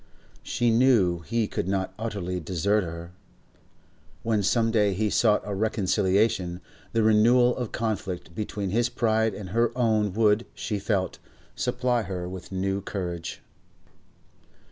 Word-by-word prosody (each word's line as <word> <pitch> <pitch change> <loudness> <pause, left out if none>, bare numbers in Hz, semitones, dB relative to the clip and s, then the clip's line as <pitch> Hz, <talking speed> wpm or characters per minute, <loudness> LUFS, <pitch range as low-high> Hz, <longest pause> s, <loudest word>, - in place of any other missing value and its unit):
She 120 -1 0
knew 115 -8 +4
he 115 +5 -1
could - - -3
not 95 -1 -1
utterly 100 -5 -3
desert 95 +5 0
her; 85 0 -7 1.1
when 110 -2 +1
some 115 +3 +2
day 105 -4 +2
he 105 +1 0
sought 105 -3 +3
a 105 - -3
reconciliation, 95 -2 +1 0.3
the 115 -1 +2
renewal 120 +3 +5
of 125 -4 -4
conflict 100 -7 -3
between 100 -1 -3
his 120 +3 +2
pride 110 -3 +1
and 95 -3 -7
her 115 +4 +2
own 110 -5 +2
would, 110 +1 +2
she 105 -3 -3
felt, 100 -2 -1 0.4
supply 125 -1 0
her 90 -3 -4
with 90 0 -8
new 95 +1 -1
courage. 90 -4 -5
105 Hz, 135 wpm, -26 LUFS, 95-115 Hz, 1.1 s, renewal